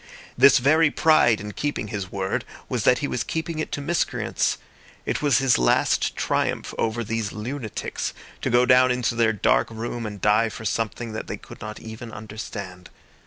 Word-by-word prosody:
This 135 +3 +7
very 155 +5 +4
pride 145 -8 +4
in 105 0 -6
keeping 145 -3 -3
his 100 -3 -5
word 95 -1 -2 0.2
was - - -2
that - - +5
he - - -1
was - - -2
keeping 160 0 -3
it 155 - -3
to 145 - -2
miscreants. 170 +4 0 0.5
It - - -1
was 145 -2 +3
his 135 -3 +3
last - - +2
triumph - - -1
over 115 +1 0
these 110 -1 -2
lunatics 115 +1 -4 0.3
to - - -1
go 120 +1 +4
down 130 0 +6
into 125 -2 0
their 115 -1 +3
dark 105 - +2
room 115 0 -4
and 105 -1 -7
die 105 +3 +3
for 110 - -9
something 115 +1 -2
that 110 - -5
they - - -4
could - - -13
not 105 0 -7
even 110 +1 -9
understand. 100 -4 -8
115 Hz, 180 wpm, -24 LUFS, 105-130 Hz, 0.5 s, This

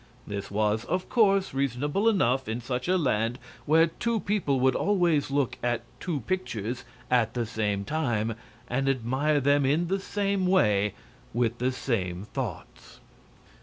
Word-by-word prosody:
This, 100 -1 -5
was, 105 +2 +1
of 180 +2 -2
course, 195 - +3
reasonable 140 - +1
enough 130 - +1
in 110 +2 -2
such 125 +2 -3
a 185 +1 +3
land, 120 -6 0 0.3
where 160 +2 +6
two 225 +7 -1
people 185 -10 0
would 130 0 +4
always 175 -7 +2
look 140 -2 0
at 120 -1 0 0.2
two 160 -6 -2
pictures 120 - -3 0.3
at 120 -2 +2
the 120 -1 0
same 105 -3 -1
time 115 -6 0 0.3
and 135 +3 0
admire 135 +4 +1
them 140 +1 +3
in 155 +6 +1
the 195 +1 +1
same 200 -1 -1
way 105 - +3 0.4
with 120 -1 0
the 125 +2 +1
same 95 -8 -2
thoughts. - - -6
130 Hz, 150 wpm, -27 LUFS, 115-170 Hz, 0.4 s, where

